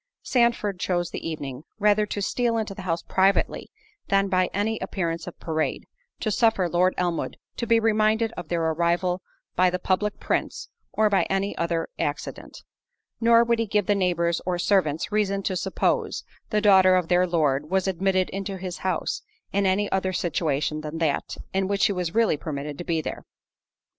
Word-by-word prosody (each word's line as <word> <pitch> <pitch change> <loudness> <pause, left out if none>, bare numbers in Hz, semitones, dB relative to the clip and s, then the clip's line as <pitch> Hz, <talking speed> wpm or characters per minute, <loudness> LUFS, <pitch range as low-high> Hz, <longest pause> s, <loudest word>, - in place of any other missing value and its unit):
Sandford 235 -6 +1
chose 175 -2 -1
the - - -4
evening, 140 -4 -6
rather 210 0 +3
to 205 0 -3
steal 235 +2 0
into 215 -2 -2
the 195 - -8
house 170 -3 -2
privately, 190 +1 +1 0.4
than 195 0 +2
by 185 -1 +2
any 215 +2 -1
appearance 170 -3 -3
of - - -9
parade, 160 -1 -2 0.4
to 215 - 0
suffer 220 -4 +3
Lord 180 +2 +2
Elmwood 175 -2 -1 0.2
to 235 - -2
be 230 0 +5
reminded 220 0 +2
of 175 -7 -8
their 170 0 -1
arrival 170 +3 +1 0.3
by 185 +1 +4
the 180 - -1
public 195 +3 -1
prints, - - -2 0.2
or 215 - +3
by 200 -2 +2
any 195 +1 0
other 170 -1 -1
accident. 145 - -4 0.6
Nor 230 0 +6
would 235 -1 +1
he 230 - 0
give 210 -1 +1
the 205 - +3
neighbours 170 -3 +1
or 180 -1 -1
servants 175 -3 +1
reason 200 -2 0
to 190 - -1
suppose, 180 - 0 0.3
the 210 -1 +1
daughter 190 -3 +6
of 180 -2 +1
their 180 +1 +3
Lord 150 -4 +1
was 190 +1 +1
admitted 190 0 +1
into 195 0 -4
his 185 -1 -6
house, 190 - -2 0.3
in 200 0 +2
any 200 +2 +2
other 190 -1 0
situation 155 -3 -1
than 155 +1 -5
that, 160 -3 -1 0.2
in 190 0 +1
which 200 0 -1
she 200 - +4
really 180 +1 +1
was - - -26
permitted 145 -1 -5
to - - -3
be 165 -2 0
there. - - -6
185 Hz, 180 wpm, -25 LUFS, 170-205 Hz, 0.6 s, Nor